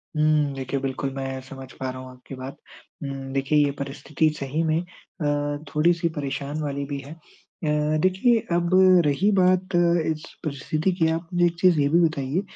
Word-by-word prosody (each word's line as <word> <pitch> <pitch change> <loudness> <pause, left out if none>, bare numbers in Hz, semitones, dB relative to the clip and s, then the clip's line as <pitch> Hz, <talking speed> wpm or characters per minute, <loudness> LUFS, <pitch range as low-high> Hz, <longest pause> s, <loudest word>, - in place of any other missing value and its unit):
हुँ, 150 -2 +2
देखिए, 135 +1 -3
बिल्कुल 135 0 -2
मैं 135 -1 -4
समझ 130 0 -10
पा 130 - -5
रहा 130 0 -6
हूँ 130 - -10
आपकी 125 +1 -11
बात। 130 +1 -8 0.5
उम, 140 -1 -4 0.2
देखिए 140 +2 +2
ये 140 - 0
परिस्थिति 140 +3 -1
सही 140 +4 -1
में 160 0 +1
अ, 145 -5 -3 0.2
थोड़ी-सी 170 +2 +3
परेशान 140 +2 -3
वाली 140 -1 -3
भी 140 0 -4
है। 140 +2 -10
अ, 165 - -16 0.8
देखिए 190 +7 +3 0.2
अब 175 0 +1 0.4
रही 185 +9 +2
बात 185 0 +2
इस 170 -2 +1 0.2
परिस्थिति 155 +4 -1
की, 160 - +4
आप 165 +1 -3
मुझे 175 0 +3
एक 170 0 +1
चीज़ 180 -3 +4
ये 140 - +3
भी 170 +4 +4
बताइए 145 +2 -2
150 Hz, 175 wpm, -24 LUFS, 140-170 Hz, 0.8 s, की